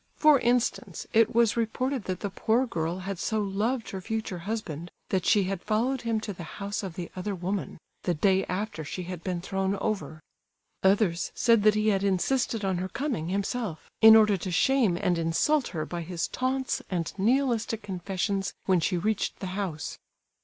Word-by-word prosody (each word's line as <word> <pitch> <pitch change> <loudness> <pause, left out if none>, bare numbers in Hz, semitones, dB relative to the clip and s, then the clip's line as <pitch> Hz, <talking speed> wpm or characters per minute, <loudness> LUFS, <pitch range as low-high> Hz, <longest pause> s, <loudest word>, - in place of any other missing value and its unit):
For 300 -3 +6
instance, 245 0 0
it 225 0 +4
was 235 -2 +4
reported 240 +2 -1
that 185 -1 -3
the 200 - -3
poor 225 +6 +1
girl 170 -6 -2
had 195 -2 -4
so 220 - 0
loved 215 +5 -1
her 190 - -5
future 220 -3 -3
husband 175 -7 -4 0.2
that 185 -2 0
she 210 -3 +5
had 190 -1 -3
followed 235 +5 0
him 230 -2 0
to 210 -2 -4
the 175 - -10 0.2
house 200 0 -3
of 190 -5 -6
the 175 -2 -6
other 195 +2 -3
woman, 185 +2 -3 0.2
the 175 - 0
day 190 +4 +3
after 195 -3 -3
she 180 +5 -5
had 175 -1 -7
been 180 -2 -2
thrown 195 +1 -1
over; 195 -6 -3 0.6
others 190 -3 +2
said 230 -3 +4
that 215 0 +5
he 215 0 +2
had 195 -2 +1
insisted 210 +3 +1
on 190 -2 0
her 185 +1 -3
coming, 260 - -2
himself, 200 -2 -3
in 220 0 +10
order 210 -2 +5
to 185 - -5
shame 220 0 +3
and 175 -1 +1
insult 240 - +2
her 155 -4 -3
by 175 -1 -5
his 170 0 -3
taunts 260 +1 -1
and 170 -4 -2
Nihilistic 230 -1 +1
confessions 195 0 -2
when 185 -2 +3
she 180 +2 0
reached 210 +4 -1
the - - -5
house. 185 -7 -4
200 Hz, 185 wpm, -28 LUFS, 180-225 Hz, 0.6 s, in